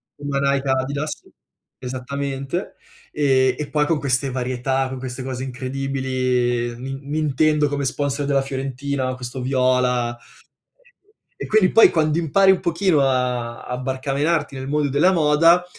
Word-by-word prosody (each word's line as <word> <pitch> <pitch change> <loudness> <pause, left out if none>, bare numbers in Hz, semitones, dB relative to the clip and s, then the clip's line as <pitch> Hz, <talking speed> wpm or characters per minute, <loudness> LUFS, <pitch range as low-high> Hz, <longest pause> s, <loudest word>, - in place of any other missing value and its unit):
Puma, 145 -1 -3
Nike, 140 0 0
Adidas. 140 +3 -2 0.6
Esattamente, 135 +5 -4 0.4
ehm, 130 -3 +2
e 150 -1 -4
poi 150 -1 +1
con 160 -3 +1
queste 135 0 0
varietà, 130 +1 -1
con 130 -1 -6
queste 130 0 -6
cose 130 -1 -4
incredibili, 130 -2 -1
Nin 135 +2 -6
Nintendo 150 0 +2
come 140 0 -2
sponsor 140 +1 -1
della 140 -1 +2
Fiorentina, 135 0 -3
questo 125 0 -6
viola. 125 -2 +1 0.5
E - - -34
e - - -5
quindi, 215 -4 +3
poi 225 - +7
quando 155 -1 +1
impari 190 +4 +4
un 185 - 0
pochino 170 -2 +1
a 125 -3 -1
a 125 - -4
barcamenarti 140 +4 -1
nel 130 +1 -6
mondo 145 -1 0
della 150 +7 +4
moda, 165 +2 +4
135 Hz, 140 wpm, -21 LUFS, 130-150 Hz, 0.6 s, poi